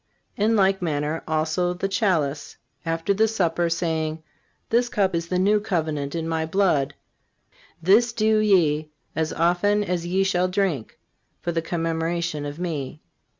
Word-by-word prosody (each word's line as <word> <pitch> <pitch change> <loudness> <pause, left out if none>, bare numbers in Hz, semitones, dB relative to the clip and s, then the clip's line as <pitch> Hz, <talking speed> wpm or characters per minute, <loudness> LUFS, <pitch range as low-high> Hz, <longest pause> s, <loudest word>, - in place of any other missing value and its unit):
In 220 +2 +2
like 195 -2 +3
manner 155 -1 -1
also 160 +3 0
the 190 +2 -2
chalice, 170 -8 0 0.3
after 165 +4 0
the 220 +3 +3
supper, 175 -5 0
saying: 160 -2 -1 0.5
This 240 +1 +3
cup 200 -7 +1
is 170 0 -2
the 180 - -1
New 205 +3 +3
Covenant 155 -7 -2
in 165 -1 -2
My 160 -1 -1
blood. 160 -5 +1 0.9
This 220 +7 +5
do 220 -1 +2
ye, 160 -8 +3 0.3
as 160 -1 0
often 180 +5 +2
as 175 -3 -2
ye 190 +2 +2
shall 185 -1 +1
drink, 185 - -1 0.4
for 175 - -2
the 165 -1 -1
commemoration 165 -2 -2
of 145 +1 -7
Me. 155 -5 -4
170 Hz, 150 wpm, -24 LUFS, 160-195 Hz, 0.9 s, This